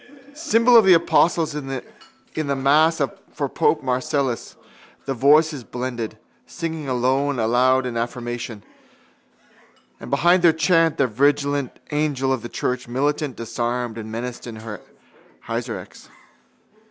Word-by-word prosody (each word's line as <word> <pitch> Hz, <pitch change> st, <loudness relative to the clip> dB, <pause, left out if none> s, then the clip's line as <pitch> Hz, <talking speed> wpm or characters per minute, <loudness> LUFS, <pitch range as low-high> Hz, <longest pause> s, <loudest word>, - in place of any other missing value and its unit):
Symbol 245 Hz, -5 st, +3 dB
of 225 Hz, -, +9 dB
the 190 Hz, -2 st, +7 dB
apostles 165 Hz, -1 st, +2 dB
in 145 Hz, -2 st, -5 dB, 0.7 s
the 145 Hz, -3 st, -1 dB
mass 150 Hz, +5 st, +3 dB, 0.3 s
for -, -, -2 dB
pope -, -, +1 dB
Marcellus, 130 Hz, 0 st, -1 dB, 0.5 s
the 135 Hz, -, -1 dB
voices 145 Hz, +2 st, +3 dB
blended, 120 Hz, -2 st, -5 dB, 0.3 s
singing 160 Hz, -4 st, -5 dB
alone 130 Hz, +3 st, +1 dB
loud 125 Hz, +3 st, +2 dB
in 125 Hz, -2 st, -4 dB
affirmation: 120 Hz, -2 st, -4 dB, 1.4 s
and -, -, -9 dB
behind 175 Hz, +1 st, +3 dB
their 170 Hz, -2 st, +5 dB
chant 165 Hz, 0 st, +2 dB
the 135 Hz, -, +3 dB
vigilant 140 Hz, +2 st, 0 dB
angel 145 Hz, -3 st, 0 dB
of 130 Hz, -, -3 dB
the 120 Hz, -, -7 dB
church 125 Hz, +1 st, -3 dB
militant 145 Hz, +3 st, -1 dB
disarmed 120 Hz, 0 st, -3 dB
and 110 Hz, 0 st, -7 dB
menaced 120 Hz, +2 st, -5 dB
her 110 Hz, -2 st, -8 dB, 0.6 s
heresiarchs. -, -, -6 dB
135 Hz, 120 wpm, -22 LUFS, 120-155 Hz, 1.4 s, of